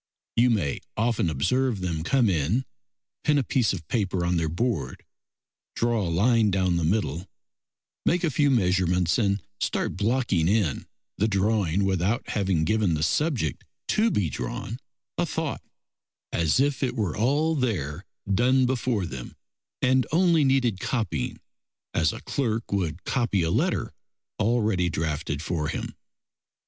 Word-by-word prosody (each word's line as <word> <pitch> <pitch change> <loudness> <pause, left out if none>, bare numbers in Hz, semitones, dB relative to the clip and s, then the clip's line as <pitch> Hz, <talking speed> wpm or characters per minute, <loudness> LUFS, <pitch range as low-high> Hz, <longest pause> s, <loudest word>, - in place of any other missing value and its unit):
You 120 +2 +4
may 90 - 0 0.2
often 115 -5 +1
observe 110 - +1
them 85 -4 -2
come 125 +5 +3
in, 95 - +1 0.6
pin 150 -1 +3
a 140 - +2
piece 125 -4 +1
of 80 -6 -6
paper 95 -4 0
on 90 +1 +1
their 80 -1 0
board, 115 +8 -2 0.7
draw 120 -1 +1
a 90 - -1
line 110 +6 +3
down 95 -2 +1
the 85 - 0
middle, 85 -1 0 0.8
make 180 +1 +1
a 165 - +2
few 145 +2 +3
measurements, 90 - +2
and 100 -2 +1 0.2
start - - -1
blocking 105 -7 +1
in 95 -7 +1 0.3
the 105 - +3
drawing 100 -3 +1
without 95 +3 0
having 95 -6 +1
given 100 -1 +2
the 75 - -1
subject 120 - 0 0.3
to 220 +2 +3
be 100 - +1
drawn 75 - -5 0.4
a - - +3
thought, - - -3 0.7
as 85 +6 +2
if 140 0 +1
it 125 -2 0
were 105 -9 -1
all 145 +8 +2
there 100 - -2 0.2
done 125 +6 +3
before 125 -5 0
them, 65 -7 -7 0.5
and 130 -2 +3
only 170 -1 +4
needed 130 -7 +2
copying, 95 - -2 0.5
as - - +2
a - - -8
clerk 115 -4 -2
would 90 -4 -1
copy 115 -8 0
a 80 - 0
letter - - 0 0.5
already 105 -5 +2
drafted 75 -2 -2
for 80 -3 -1
him. - - -4
105 Hz, 145 wpm, -26 LUFS, 85-125 Hz, 0.8 s, You